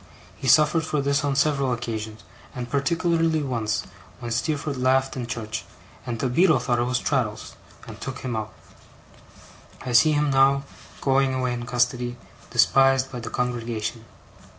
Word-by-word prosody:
He 135 - -6
suffered 155 +5 +5
for 155 -2 -1
this 140 +1 +1
on 140 -1 0
several 140 -2 +2
occasions; 110 -3 -4 0.3
and 125 -1 -4
particularly 165 +2 +1
once, 115 -5 -1 0.4
when 120 -2 -6
Steerforth 140 +4 -1
laughed 130 +1 +2
in 125 -3 -4
church, 110 -2 -4 0.4
and 120 -2 -2
the 130 - -1
Beadle 155 +5 +4
thought 120 0 0
it 120 - +1
was 125 0 0
Traddles, 115 -6 -2 0.3
and - - -10
took - - -6
him 125 -3 -3
out. 110 -1 -4 1.3
I 125 - -3
see 155 +6 +5
him 150 -1 +1
now, 135 +1 +4 0.4
going 135 -1 +2
away 125 -1 -1
in 120 0 -5
custody, 120 0 0 0.3
despised 135 +2 +4
by 125 - -5
the 115 - -6
congregation. 115 -2 -3
130 Hz, 155 wpm, -24 LUFS, 120-140 Hz, 1.3 s, suffered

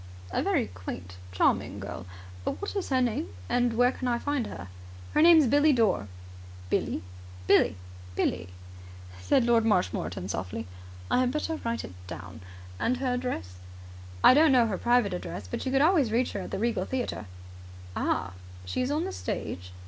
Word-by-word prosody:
"A - - 0
very - - +1
quaint 90 0 -8
and - - -16
charming 95 - +1
girl. 90 +2 -7 0.4
What 405 - -4
is 395 - -2
her 260 -2 +3
name? 230 - -1 0.2
And 245 -1 +2
where 245 +1 +5
can 255 - -4
I 240 -1 +2
find 285 -2 -1
her?" 90 -1 -8 0.5
"Her - - +4
name's 325 -2 +8
Billie 290 +4 +4
Dore." 215 - +2 0.6
"Billie?" - - 0 0.4
"Billie." 105 - +4 0.4
"Billie!" 90 0 -1 0.7
said 165 - +2
Lord 235 -1 +4
Marshmoreton 90 - 0
softly. 95 +3 -4 0.5
"I - - +4
had 255 -1 +2
better 305 +3 -2
write 235 -3 -3
it 90 - -8
down. - - -8 0.4
And 250 +2 +1
her 255 -1 0
address?" 250 - -3 0.7
"I - - +9
don't 305 +2 +6
know 250 -3 +5
her 205 -4 -2
private 240 -5 +3
address. 100 - -5
But 90 - -4
you - - 0
could 270 +1 +4
always 310 - +4
reach 240 +3 +1
her - - -4
at 185 - -6
the - - -3
Regal 230 +2 0
Theatre." 250 - -3 0.7
"Ah! - - -1 0.3
She 90 - -2
is 255 - 0
on 300 +3 0
the 385 - -3
stage?" 90 - -5
235 Hz, 175 wpm, -28 LUFS, -, 0.7 s, I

